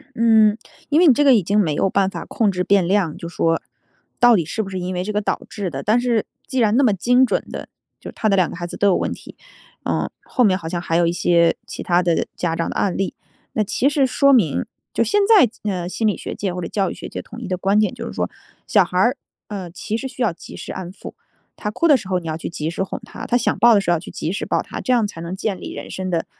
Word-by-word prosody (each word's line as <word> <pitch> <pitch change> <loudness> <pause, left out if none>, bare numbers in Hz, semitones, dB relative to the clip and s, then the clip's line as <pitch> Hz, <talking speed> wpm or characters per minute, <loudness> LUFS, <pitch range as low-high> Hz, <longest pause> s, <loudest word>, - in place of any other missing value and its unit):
嗯， 220 -2 +5 0.3
因 305 +3 +3
为 355 - +6
你 275 - +8
这 290 - +2
个 270 -3 +7
已 215 - +3
经 200 +5 +1
没 155 -7 +1
有 190 - +1
办 195 -1 +2
法 - - -6
控 220 -3 +1
制 180 -1 -2
变 195 -2 +3
量， 185 -4 +1
就 170 - -7
说 165 -1 0 0.6
到 245 -1 +6
底 170 - 0
是 220 +8 -3
不 195 - -7
是 190 - -4
因 185 +1 -3
为 180 0 -2
这 210 - -3
个 210 - 0
导 205 - -2
致 200 -4 -4
的。 135 -3 -5
但 220 +7 +2
是 240 -3 0 0.2
既 260 - -3
然 220 -1 +3
那 275 - +4
么 220 - +4
精 245 +7 +3
准 - - -1
的， - - -7 0.3
就 - - -8
他 215 - -1
的 195 - +3
2 185 -3 +3
个 - - -8
孩 175 - -4
子 175 - -8
都 205 - +3
有 185 - +4
问 - - -1
题。 - - -11 0.5
呃， - - -1
后 250 - +1
面 190 -4 +4
好 160 - -6
像 175 0 -2
还 165 -2 -1
有 170 -1 +3
一 170 - +1
些 170 -1 +3
其 - - -7
他 175 0 +2
的 170 -2 +1
家 170 -2 -1
长 165 - -1
的 - - -6
案 195 - 0
例。 195 - -2 0.4
那 215 - +1
其 250 +6 +1
实 285 -2 +2
说 280 +2 +3
明 195 - +3 0.3
就 - - +1
现 415 - +2
在， 415 - +6 0.2
呃， 180 -2 -3
心 220 +4 -1
理 210 - +2
学 - - -6
界 195 -3 -3
或 180 - -4
者 170 - -4
教 195 -3 0
育 - - -6
学 - - -8
界 - - -6
统 230 +2 -11
一 220 - -6
的 185 - -1
观 195 +3 +2
点 215 -1 +2
就 - - -7
是 - - -6
说， - - -2 0.4
小 205 -4 +4
孩 180 0 -3
儿， 240 +8 +3 0.3
呃， 190 -4 -6
其 210 +5 -4
实 265 - -4
需 255 - -5
要 220 -6 +2
及 165 - -12
时 - - -7
安 185 -1 -6
抚， - - -10 0.4
他 210 - -3
哭 335 +10 +1
的 290 - +7
时 195 - -8
候， 185 -1 +1
你 170 - -8
要 155 - -2
去 160 - -5
及 160 -2 -4
时 175 - -2
哄 190 - -5
他， - - -8
他 245 - +1
想 245 - +1
抱 235 +2 +6
的 200 - +4
时 175 - -1
候 170 - +4
要 - - -2
去 165 - -10
及 160 - -4
时 200 - -3
抱 - - 0
他， - - -7
这 255 - 0
样 235 -4 +3
才 200 -5 -8
能 170 +2 -5
建 195 -1 -2
立 - - -7
人 - - -8
生 185 0 -4
的 170 -2 -1
195 Hz, 315 characters per minute, -21 LUFS, 175-225 Hz, 0.6 s, 你